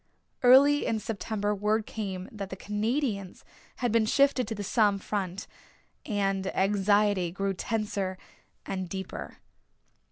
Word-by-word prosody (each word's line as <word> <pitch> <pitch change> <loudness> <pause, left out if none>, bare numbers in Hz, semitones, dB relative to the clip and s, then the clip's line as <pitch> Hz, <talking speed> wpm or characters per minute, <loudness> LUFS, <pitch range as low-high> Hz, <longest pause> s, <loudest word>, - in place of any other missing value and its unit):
Early 275 +4 +6
in 225 - +1
September 210 -1 -2
word 210 +2 0
came 190 -4 -5
that 200 -3 -6
the 190 - -5
Canadians 210 0 -2 0.3
had 245 -2 -1
been 225 -1 +3
shifted 275 0 +3
to 225 - -3
the 205 - -5
Somme 205 -1 +3
front 195 -2 -3 0.6
and 195 -3 0
anxiety 200 -1 +2
grew 195 +2 -1
tenser 200 -2 -2 0.5
and 185 -2 -4
deeper. 190 0 -6
205 Hz, 125 wpm, -28 LUFS, 195-220 Hz, 0.6 s, Early